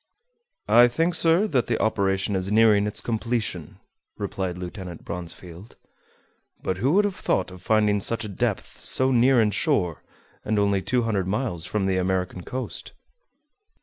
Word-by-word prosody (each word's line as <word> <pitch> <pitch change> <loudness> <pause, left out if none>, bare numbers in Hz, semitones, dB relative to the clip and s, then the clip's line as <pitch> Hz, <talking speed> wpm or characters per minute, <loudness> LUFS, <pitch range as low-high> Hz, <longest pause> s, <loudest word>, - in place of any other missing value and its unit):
"I 120 +1 +7
think, 165 +8 0
sir, 165 +4 +4
that 130 -8 +1
the 115 - 0
operation 100 -2 0
is 95 +1 -2
nearing 105 -2 +4
its 105 - -1
completion," 110 -7 -3 0.4
replied 95 -3 -4
Lieutenant 90 -1 -8
Bronsfield. 90 +3 -8 0.9
"But 95 - -2
who 130 +9 +1
would 205 +2 +4
have 200 -3 -2
thought 95 - -1
of 90 0 -12
finding 105 -1 +2
such 115 +2 -1
a - - -4
depth 100 - -3
so 130 0 +2
near 125 +1 +4
in 110 -2 +3
shore, 90 -4 0 0.4
and 110 - -1
only 100 -1 +2
200 115 -5 0
miles 95 -5 -2
from 105 -2 -1
the 95 -1 +1
American 90 0 -1
coast?" 130 +8 -6
105 Hz, 150 wpm, -24 LUFS, 95-120 Hz, 0.9 s, I